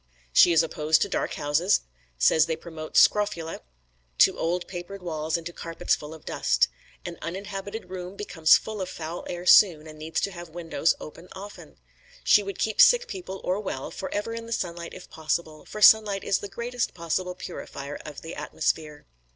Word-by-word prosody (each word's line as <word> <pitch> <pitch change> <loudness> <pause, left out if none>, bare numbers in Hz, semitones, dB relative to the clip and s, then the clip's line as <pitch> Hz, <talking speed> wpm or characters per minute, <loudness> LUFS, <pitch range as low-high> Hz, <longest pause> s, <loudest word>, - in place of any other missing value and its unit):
She 175 - +7
is 165 - +5
opposed 155 -1 +2
to 200 - -4
dark - - -2
houses; 150 +7 +2 0.4
says 65 - +4
they 165 - -1
promote 160 -1 -6
scrofula; 205 -6 +3 0.6
to - - +6
old 175 +2 -1
papered 185 +1 -8
walls 160 -1 -2
and 165 - -9
to 170 - -6
carpets 165 0 -2
full 150 +1 -4
of 160 - -16
dust. - - +2 0.4
An - - -6
uninhabited 195 +3 -6
room 185 0 -6
becomes 165 -6 +4
full 215 -2 -6
of 185 - -3
foul 165 +1 -6
air 175 0 -5
soon, 175 -5 +6
and 155 -1 -11
needs 160 +1 -2
to 200 - -1
have 175 -2 -9
the 160 - -22
windows 165 -1 0
open 165 +3 -10
often. 200 +2 -11 0.5
She 210 - +6
would 200 -1 -6
keep 220 -1 +2
sick - - +6
people, 360 - -7
or 185 +3 0
well, 160 -10 -5
forever 205 +4 -4
in 230 0 -6
the 230 - -3
sunlight 170 -4 -4
if 185 - -11
possible, 155 -1 -3
for 210 - -4
sunlight 210 -3 +6
is 195 - +1
the 200 - -7
greatest 240 +3 -3
possible 180 +2 -2
purifier 145 -5 -7
of 150 -2 -9
the 165 - -7
atmosphere. 150 -2 -3
175 Hz, 185 wpm, -26 LUFS, 160-200 Hz, 0.6 s, She